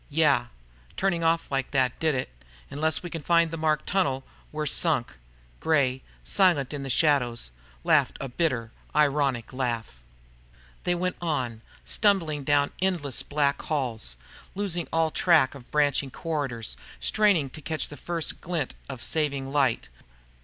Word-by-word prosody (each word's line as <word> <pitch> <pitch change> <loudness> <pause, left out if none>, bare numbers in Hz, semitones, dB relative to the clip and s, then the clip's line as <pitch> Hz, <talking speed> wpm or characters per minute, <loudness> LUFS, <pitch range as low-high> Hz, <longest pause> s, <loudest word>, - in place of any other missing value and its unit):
"Yeah. 140 -5 +3 0.5
Turning 180 -3 +1
off 165 -1 +1
like 135 -1 -1
that 130 -3 +1
did 160 -3 +1
it. 125 - -3 0.4
Unless 155 +3 0
we 175 - -6
can 165 - -4
find 170 +1 +3
that 165 - -4
marked 155 -1 +1
tunnel, 140 -9 +1 0.3
we're 155 0 -3
sunk!" 150 -4 +2 0.4
Gray, 130 -5 +2 0.2
silent 170 -9 +3
in 145 - -4
the 135 - -5
shadows, 125 - +2 0.3
laughed - - +3
a 135 - -4
bitter, 125 -5 -1 0.2
ironic 140 -5 +2
laugh. 120 - -3 0.9
They 175 - +2
went 180 +1 -1
on, 130 -9 -2 0.2
stumbling 170 -9 +2
down 145 +1 +2
endless 170 -9 0
black 145 -1 0
halls, 115 - -1 0.4
losing 180 -4 -2
all 160 -1 +2
track 160 -7 +4
of 135 -3 -13
branching 145 -2 +2
corridors, 140 -7 -3 0.2
straining 165 - +3
to 155 - -10
catch 155 +1 -2
the 145 - -8
first 170 +1 -3
glint 170 -2 -2 0.2
of 130 -4 -5
saving 140 -2 -1
light. 135 - +1
145 Hz, 145 wpm, -27 LUFS, 130-165 Hz, 0.9 s, track